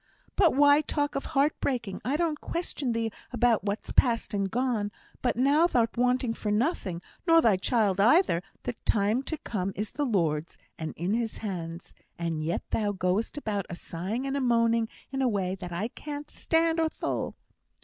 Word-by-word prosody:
"But 350 -8 +4
why 285 +1 +6
talk 290 -1 -1
of 275 - -3
thy - - -6
heart 285 +2 +2
breaking? 235 -8 -2
I 260 +6 0
don't 320 -3 0
question 295 -7 -2
thee 225 -1 -1 0.2
about 240 -4 +2
what's 205 +1 -3
past 235 -4 +2
and 195 -1 0
gone; 230 -3 0 0.3
but 250 - +1
now 285 +7 +4
thou'rt 230 -8 +1
wanting 250 -1 +2
for 215 - -4
nothing, 210 - 0 0.2
nor 330 0 +7
thy 225 -10 +5
child 200 0 +1
either; 235 - +5 0.2
the 245 - -2
time 215 +4 +2
to 315 +3 -4
come 195 -8 -3
is 210 +1 -3
the 290 - -1
Lord's, 165 -8 0 0.2
and 160 -1 -5
in 175 +5 -1
His 230 -1 -1
hands; 170 -5 -5 0.2
and 165 -2 -2
yet 165 +2 -1
thou 210 -2 +1
goest 190 +7 -1
about 210 -8 -2
a 175 - -5
sighing 190 +10 -4
and 275 0 -2
a 280 - 0
moaning 230 -2 +2 0.2
in 270 0 -2
a 260 - +3
way 190 -4 -1
that 180 -2 -7
I 195 +7 -2
can't 295 +2 -7
stand 325 0 +1
or 320 -1 +2
thole." - - -3
230 Hz, 190 wpm, -28 LUFS, 195-275 Hz, 0.3 s, nor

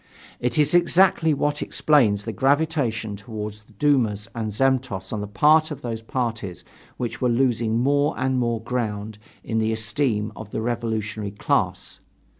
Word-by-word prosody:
This 120 -1 -1
is 150 +1 +3
exactly 175 -1 +4
what 145 0 0
explains 115 -10 +2
the 115 - -4
gravitation 135 -7 +1
toward 105 0 -6 0.2
dumas 115 -8 +2
and 110 -2 -3
zemstvos 125 -5 0
on 105 - -2
the 105 - -4
part 155 +9 +4
of 145 -3 -7
those 115 -2 -4
parties 115 -6 -4 0.3
which 120 0 -4
were 125 - +2
losing 115 -2 +1
more 145 +4 +2
and 130 0 0
more 120 -2 0
ground 110 -3 -3 0.2
in 115 -1 -1
the 110 0 +1
esteem 110 0 -1
of 110 - -9
the 110 - -3
revolutionary 110 -3 -2
class. 100 - -1
115 Hz, 150 wpm, -23 LUFS, 110-135 Hz, 0.3 s, exactly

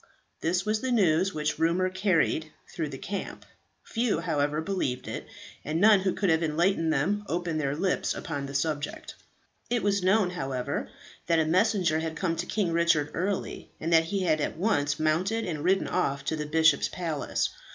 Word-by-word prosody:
This 180 +4 0
was 215 0 0
the 260 - -1
news 190 -4 +3
which 150 -3 -2
rumour 170 +3 +2
carried 185 -5 +1 0.2
through 160 -5 -3
the 135 - -7
camp. 195 +7 -6 0.4
Few, 230 -7 0
however, 150 -3 0
believed 160 -7 -2
it, - - -5 0.4
and 155 +3 -2
none 210 +1 +7
who 190 -1 0
could 195 -4 +1
have 160 +1 +2
enlightened 165 +1 +1
them 190 +9 0
opened 170 -2 -1
their 140 -1 -1
lips 185 +4 0
upon 145 -5 -4
the 135 - -8
subject. 150 +1 -2 0.6
It 240 -1 0
was 200 -1 +2
known, 190 0 +3
however, 135 -8 -3 0.4
that 170 -1 +3
a 160 - +3
messenger 180 -2 +2
had 160 0 -3
come 165 -1 -1
to - - -3
King 200 -6 0
Richard 165 -3 +2
early, 190 +3 -3
and 165 +2 -1
that 165 0 +5
he 195 +3 -1
had 155 -3 +2
at - - -2
once 150 -7 +1
mounted, 180 +9 +1
and 155 -4 -4
ridden 190 +2 +2
off 140 0 -1
to 160 - 0
the 150 -1 -4
bishop's 160 -1 +3
palace. 165 -5 -2
165 Hz, 185 wpm, -27 LUFS, 155-190 Hz, 0.6 s, none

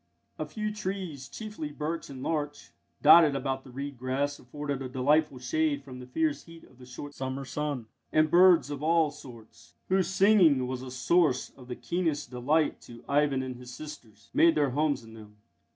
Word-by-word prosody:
A 155 - -3
few 215 +5 -3
trees, 190 -9 -5
chiefly 210 -9 -6
birch 155 +3 -4
and 130 -2 -8
larch, 145 -2 -3 0.3
dotted 155 -1 +8
about 135 0 -2
the - - -14
reed 140 +1 -6
grass 135 +3 -1
afforded 140 +1 -5
a 130 - -5
delightful 140 +2 +2
shade 145 +3 0
from 130 -2 -10
the 125 - -10
fierce 155 +3 -1
heat 165 -1 -14
of 130 - -20
the 125 - -13
short 145 +3 -8
summer 135 0 -4
sun; 145 -4 -3 0.3
and 155 0 +3
birds 175 -4 +6
of 145 -1 -5
all 160 -1 +3
sorts, 115 -6 -14
whose 190 -1 +2
singing 190 -9 +4
was 125 0 -4
a 130 - -7
source 135 +1 +1
of 125 -2 -15
the 125 - -5
keenest 150 +1 -2
delight 145 +6 +1
to 115 -1 -13
Ivan 140 -2 +2
and 130 -1 -6
his 125 0 -10
sisters, 110 -10 -11
made 170 0 +5
their 145 -3 +2
homes 145 -2 0
in 110 0 -13
them. 105 -2 -13
145 Hz, 185 wpm, -28 LUFS, 130-155 Hz, 0.3 s, dotted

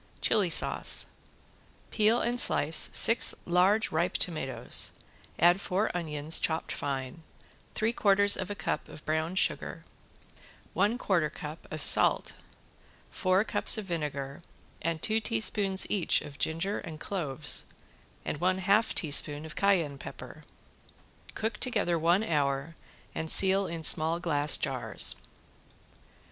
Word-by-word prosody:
~CHILI 205 -5 +1
SAUCE~ 160 - 0 0.9
Peel 220 +2 +2
and 240 +1 -1
slice 155 -6 +4
six 230 - +4
large 185 +5 +2
ripe 170 +3 -1
tomatoes, 135 -8 -1 0.4
add 175 +3 +3
four 195 +1 -2
onions 155 -2 0
chopped 160 0 -2
fine, 135 +1 -5 0.5
three 220 +2 -1
quarters 200 -2 +3
of 185 - -5
a 205 - -5
cup - - -4
of 155 - -13
brown 160 +3 -2
sugar, - - -1 0.9
one 210 +4 +1
quarter 175 -9 0
cup 155 0 -10
of 155 -2 -4
salt, - - +3 0.8
four 185 +2 +1
cups 225 - +3
of 215 - -5
vinegar 145 -5 -5 0.4
and 165 -1 -3
two 220 +1 +1
teaspoons 195 - +1
each 195 -5 0
of 145 -1 -12
ginger 165 +6 -2
and 160 -4 -9
cloves 150 -7 0 0.6
and 145 - -4
one 185 +1 +1
half 200 +4 +1
teaspoon 150 -1 +2
of 155 - -10
cayenne 170 -9 0
pepper. - - -10 0.9
Cook 220 0 -3
together 205 -9 -1
one 170 +6 +2
hour 145 -3 -2 0.4
and 160 - -3
seal 195 0 +5
in 165 -1 -6
small 160 +2 +4
glass 150 -4 +1
jars. - - -1
170 Hz, 130 wpm, -28 LUFS, 155-200 Hz, 0.9 s, seal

